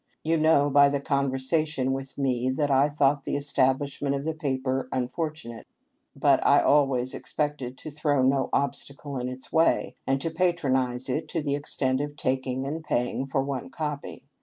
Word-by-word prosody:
You 165 Hz, +1 st, +2 dB
know 155 Hz, -2 st, +4 dB
by 140 Hz, 0 st, +6 dB
the 140 Hz, 0 st, -1 dB
conversation 140 Hz, +1 st, 0 dB
with 135 Hz, 0 st, -5 dB
me 130 Hz, -2 st, 0 dB
that 145 Hz, +2 st, 0 dB
I 135 Hz, +2 st, +4 dB
thought 145 Hz, -1 st, +2 dB
the -, -, -2 dB
estab 135 Hz, -2 st, +2 dB
lishment 140 Hz, 0 st, -3 dB
of 140 Hz, +1 st, -4 dB
the 160 Hz, -, -1 dB
paper 130 Hz, -4 st, -2 dB
unfortunate, 130 Hz, -1 st, -4 dB, 0.5 s
but -, -, +3 dB
I -, -, +6 dB
always 135 Hz, -3 st, +2 dB
expected 145 Hz, -4 st, -3 dB
to 155 Hz, -, -8 dB
throw 145 Hz, -2 st, +1 dB
no 135 Hz, 0 st, +2 dB
obstacle 140 Hz, 0 st, -3 dB
in 125 Hz, 0 st, -3 dB
its 130 Hz, +1 st, -10 dB
way, 165 Hz, 0 st, +3 dB
and 135 Hz, 0 st, +2 dB
to 165 Hz, +4 st, -3 dB
patronize 130 Hz, -8 st, 0 dB
it 145 Hz, +5 st, -2 dB
to 165 Hz, -, -2 dB
the 140 Hz, -1 st, -1 dB
extent 135 Hz, -2 st, -1 dB
of 145 Hz, 0 st, -5 dB
taking 130 Hz, -1 st, -1 dB
and 155 Hz, +3 st, -4 dB
paying 125 Hz, -1 st, -1 dB
for 135 Hz, 0 st, 0 dB
one 135 Hz, -1 st, -4 dB
copy. 150 Hz, 0 st, -5 dB
140 Hz, 175 wpm, -26 LUFS, 130-150 Hz, 0.5 s, by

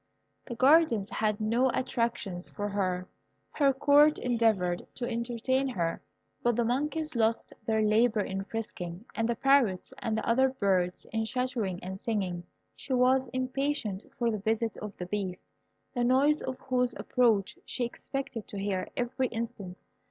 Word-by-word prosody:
The 240 Hz, -, -5 dB
gardens 260 Hz, -6 st, +4 dB
had 210 Hz, -1 st, 0 dB
no 230 Hz, +4 st, +2 dB
attractions 230 Hz, -8 st, -2 dB
for 205 Hz, 0 st, -4 dB
her. 185 Hz, -2 st, -1 dB, 0.4 s
Her 280 Hz, -2 st, +3 dB
Court 290 Hz, +3 st, +5 dB
endeavoured 220 Hz, -8 st, +1 dB
to 240 Hz, -, -3 dB
entertain 240 Hz, +3 st, 0 dB
her, 170 Hz, -10 st, -2 dB, 0.4 s
but 240 Hz, -1 st, +2 dB
the 235 Hz, 0 st, +1 dB
monkeys 300 Hz, +5 st, -1 dB
lost 225 Hz, 0 st, +1 dB
their 220 Hz, -1 st, +2 dB
labour 215 Hz, +1 st, +3 dB
in 195 Hz, 0 st, -3 dB
frisking, 195 Hz, -4 st, -6 dB
and 225 Hz, 0 st, -1 dB
the 235 Hz, -, +1 dB
parrots 250 Hz, -8 st, +2 dB
and 220 Hz, -1 st, -1 dB
other 260 Hz, +3 st, +3 dB
birds 190 Hz, -8 st, 0 dB
in 225 Hz, 0 st, +1 dB
chattering 235 Hz, -6 st, -1 dB
and 190 Hz, +1 st, -6 dB
singing. 185 Hz, -6 st, -2 dB, 0.3 s
She 265 Hz, -, -5 dB
was 255 Hz, +1 st, +4 dB
impatient 255 Hz, -4 st, -2 dB
for 235 Hz, -1 st, +1 dB
the 215 Hz, -, -2 dB
visit 225 Hz, +2 st, 0 dB
of 210 Hz, -1 st, -7 dB
the 180 Hz, -, -4 dB
Beast, 185 Hz, -1 st, -3 dB, 0.5 s
the 245 Hz, -2 st, 0 dB
noise 275 Hz, +5 st, +4 dB
of 260 Hz, -1 st, -4 dB
whose 250 Hz, -2 st, 0 dB
approach 225 Hz, -6 st, +1 dB
she 245 Hz, -, -2 dB
expected 260 Hz, -1 st, -5 dB
to 205 Hz, -, -7 dB
hear 195 Hz, -2 st, -1 dB
every 255 Hz, +1 st, 0 dB
instant. 225 Hz, -6 st, -6 dB
230 Hz, 150 wpm, -29 LUFS, 200-255 Hz, 0.5 s, Court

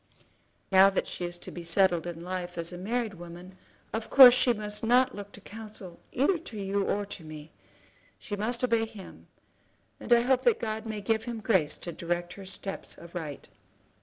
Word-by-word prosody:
"Now 190 Hz, +1 st, +8 dB
that 195 Hz, -, -1 dB
she 175 Hz, -, -4 dB
is 175 Hz, 0 st, -5 dB
to -, -, -7 dB
be 175 Hz, -, -7 dB
settled 175 Hz, 0 st, +2 dB
in 170 Hz, -1 st, -6 dB
life 180 Hz, -1 st, -5 dB
as 170 Hz, +1 st, -3 dB
a -, -, -6 dB
married 225 Hz, +2 st, -2 dB
woman, 175 Hz, +1 st, -11 dB, 0.4 s
of 220 Hz, 0 st, -3 dB
course 260 Hz, -3 st, +10 dB
she 250 Hz, 0 st, +3 dB
must 210 Hz, -2 st, -4 dB
not 250 Hz, +3 st, +4 dB
look 205 Hz, 0 st, -8 dB
for 205 Hz, -, -12 dB
counsel 210 Hz, -4 st, -10 dB
either 295 Hz, +8 st, +2 dB
to 240 Hz, -9 st, -10 dB
you 200 Hz, 0 st, -1 dB
or 205 Hz, +1 st, -1 dB
to 195 Hz, -3 st, -6 dB
me. 155 Hz, 0 st, -10 dB, 0.7 s
She 205 Hz, -, -5 dB
must 235 Hz, +5 st, -1 dB
obey 230 Hz, -2 st, +2 dB
him, 215 Hz, -4 st, -12 dB, 0.7 s
and -, -, -9 dB
I 235 Hz, 0 st, +7 dB
hope 255 Hz, +1 st, +2 dB
that 480 Hz, -3 st, +4 dB
God 220 Hz, 0 st, -3 dB
may 215 Hz, -1 st, -4 dB
give 220 Hz, +1 st, 0 dB
him 235 Hz, -2 st, -4 dB
grace 190 Hz, -9 st, +1 dB
to 175 Hz, -, -3 dB
direct 175 Hz, +1 st, -3 dB
her 195 Hz, -1 st, -10 dB
steps 195 Hz, +1 st, -5 dB
aright." 165 Hz, -4 st, -7 dB
200 Hz, 195 wpm, -28 LUFS, 175-225 Hz, 0.7 s, course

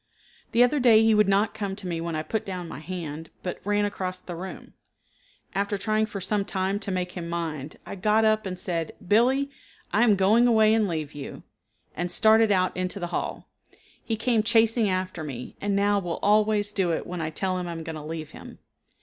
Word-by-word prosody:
The 235 Hz, -, +5 dB
other 265 Hz, +4 st, +2 dB
day 225 Hz, -3 st, +6 dB
he 225 Hz, 0 st, +5 dB
would 210 Hz, -1 st, +4 dB
not 200 Hz, +2 st, +2 dB
come 200 Hz, -3 st, -3 dB
to 195 Hz, -, -10 dB
me 170 Hz, -2 st, -2 dB
when 170 Hz, -1 st, -3 dB
I 155 Hz, -, -2 dB
put 220 Hz, +5 st, -2 dB
down 180 Hz, -3 st, -5 dB
my 155 Hz, -, -7 dB
hand, 160 Hz, -2 st, -6 dB
but 180 Hz, -, -4 dB
ran 205 Hz, +1 st, +1 dB
across 185 Hz, -2 st, -3 dB
the 175 Hz, -, -8 dB
room. 185 Hz, +3 st, -8 dB, 0.8 s
After 200 Hz, +1 st, -1 dB
trying 215 Hz, +2 st, 0 dB
for 200 Hz, -, -6 dB
some 200 Hz, +2 st, 0 dB
time 195 Hz, +1 st, -1 dB
to 200 Hz, -, -5 dB
make 180 Hz, -1 st, -2 dB
him 170 Hz, -2 st, -6 dB
mind, 160 Hz, -4 st, -4 dB
I -, -, -7 dB
got 210 Hz, +3 st, +2 dB
up 215 Hz, -1 st, +2 dB
and 185 Hz, -1 st, -4 dB
said, 170 Hz, -3 st, -3 dB
"Billee, 260 Hz, +7 st, +3 dB, 0.4 s
I 210 Hz, -, +3 dB
am 225 Hz, -4 st, +5 dB
going 210 Hz, +6 st, +4 dB
away 220 Hz, -2 st, +5 dB
and 220 Hz, -2 st, +3 dB
leave 155 Hz, -4 st, -3 dB
you," 145 Hz, -2 st, -8 dB, 0.5 s
and 175 Hz, +2 st, -2 dB
started 220 Hz, +2 st, +5 dB
out 185 Hz, -2 st, +2 dB
into 185 Hz, +2 st, -3 dB
the 175 Hz, -1 st, -5 dB
hall. -, -, -3 dB, 0.6 s
He 225 Hz, -, -1 dB
came 230 Hz, 0 st, +2 dB
chasing 225 Hz, -1 st, +3 dB
after 185 Hz, -3 st, -2 dB
me, 130 Hz, -5 st, -7 dB
and 200 Hz, 0 st, 0 dB
now 200 Hz, 0 st, +3 dB
will 175 Hz, -3 st, -3 dB
always 210 Hz, 0 st, +3 dB
do 190 Hz, -4 st, 0 dB
it -, -, -2 dB
when 180 Hz, -1 st, -5 dB
I 155 Hz, -, -2 dB
tell 185 Hz, +3 st, -2 dB
him 180 Hz, -, -4 dB
I -, -, -4 dB
am 165 Hz, -1 st, -6 dB
going 160 Hz, 0 st, -6 dB
to 155 Hz, -, -6 dB
leave 155 Hz, 0 st, -6 dB
him. -, -, -11 dB
195 Hz, 220 wpm, -26 LUFS, 175-215 Hz, 0.8 s, day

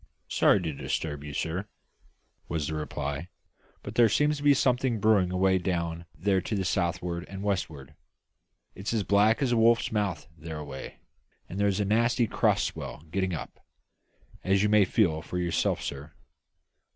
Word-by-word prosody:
"Sorry 100 Hz, -, +4 dB
to 80 Hz, -2 st, -2 dB
disturb 75 Hz, +1 st, -3 dB
you, 75 Hz, -, -6 dB
sir," 85 Hz, +7 st, -3 dB, 0.8 s
was 80 Hz, -3 st, -1 dB
the 80 Hz, -, -3 dB
reply, 75 Hz, 0 st, -4 dB, 0.6 s
"but -, -, -7 dB
there 120 Hz, -2 st, +5 dB
seems 150 Hz, +7 st, +2 dB
to -, -, -8 dB
be 145 Hz, -1 st, +6 dB
something 125 Hz, -3 st, +1 dB
brewing 100 Hz, -4 st, +3 dB
away 95 Hz, 0 st, +3 dB
down 85 Hz, -2 st, -2 dB
there 95 Hz, -1 st, +1 dB
to 105 Hz, -, -3 dB
the 95 Hz, -2 st, -1 dB
south'ard 85 Hz, -1 st, -1 dB
and 95 Hz, 0 st, -7 dB
west'ard. 80 Hz, -8 st, -3 dB, 0.8 s
It's 100 Hz, +4 st, -4 dB
as 105 Hz, -, +1 dB
black 105 Hz, +6 st, +3 dB
as 130 Hz, -, +1 dB
a 120 Hz, -, +3 dB
wolf's 115 Hz, +1 st, +4 dB
mouth 100 Hz, -7 st, -1 dB
thereaway; 75 Hz, -4 st, -7 dB, 0.5 s
and 95 Hz, -, -6 dB
there 100 Hz, -, +3 dB
is 100 Hz, -1 st, 0 dB
a 105 Hz, -, +1 dB
nasty 115 Hz, +4 st, +2 dB
cross -, -, +2 dB
swell 75 Hz, -, -5 dB
getting 95 Hz, -1 st, 0 dB
up, -, -, -8 dB, 0.8 s
as 95 Hz, +1 st, +2 dB
you 105 Hz, -, +3 dB
may 105 Hz, -1 st, +5 dB
feel 85 Hz, -6 st, +2 dB
for 90 Hz, -, -5 dB
yourself, 85 Hz, -2 st, 0 dB
sir." 70 Hz, +2 st, -6 dB
95 Hz, 165 wpm, -28 LUFS, 80-105 Hz, 0.8 s, be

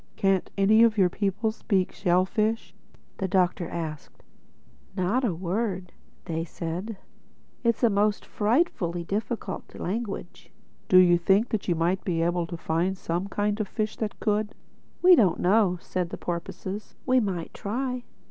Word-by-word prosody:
"Can't 195 Hz, -2 st, +1 dB
any 210 Hz, +3 st, +5 dB
of 230 Hz, -1 st, +5 dB
your 185 Hz, -3 st, +5 dB
people 205 Hz, +4 st, -1 dB
speak 195 Hz, -4 st, 0 dB
shellfish?" 205 Hz, +5 st, 0 dB, 0.5 s
the 190 Hz, -, 0 dB
Doctor 180 Hz, -2 st, +1 dB
asked. 155 Hz, -3 st, -6 dB, 0.7 s
"Not 195 Hz, +8 st, +1 dB
a 235 Hz, -, +2 dB
word," 185 Hz, +1 st, -2 dB, 0.6 s
said 170 Hz, +5 st, -4 dB
they. 225 Hz, +2 st, -7 dB
"It's 235 Hz, -, 0 dB
a 235 Hz, -, +6 dB
most 205 Hz, +1 st, +1 dB
frightfully 210 Hz, -, 0 dB
difficult 210 Hz, +5 st, -4 dB
language." 200 Hz, -2 st, -5 dB, 0.4 s
"Do 185 Hz, -, +7 dB
you 175 Hz, -1 st, +6 dB
think 195 Hz, +6 st, +3 dB
that 220 Hz, -, -2 dB
you 175 Hz, -, +2 dB
might 175 Hz, +3 st, 0 dB
be 165 Hz, -3 st, 0 dB
able 175 Hz, 0 st, 0 dB
to 170 Hz, -, -6 dB
find 165 Hz, +3 st, 0 dB
me -, -, -8 dB
some 175 Hz, +1 st, -3 dB
kind 205 Hz, +1 st, -1 dB
of 210 Hz, -, -2 dB
a -, -, -24 dB
fish 215 Hz, -1 st, -2 dB
that 215 Hz, -2 st, -4 dB
could?" 210 Hz, 0 st, 0 dB, 0.5 s
"We 365 Hz, 0 st, +9 dB
don't 190 Hz, -, +3 dB
know," 190 Hz, -1 st, +3 dB
said 180 Hz, 0 st, -3 dB
the -, -, -6 dB
porpoises. 185 Hz, +4 st, -5 dB
"We 255 Hz, 0 st, +4 dB
might 185 Hz, -7 st, -3 dB
try." 250 Hz, +4 st, -3 dB
195 Hz, 155 wpm, -26 LUFS, 175-215 Hz, 0.7 s, We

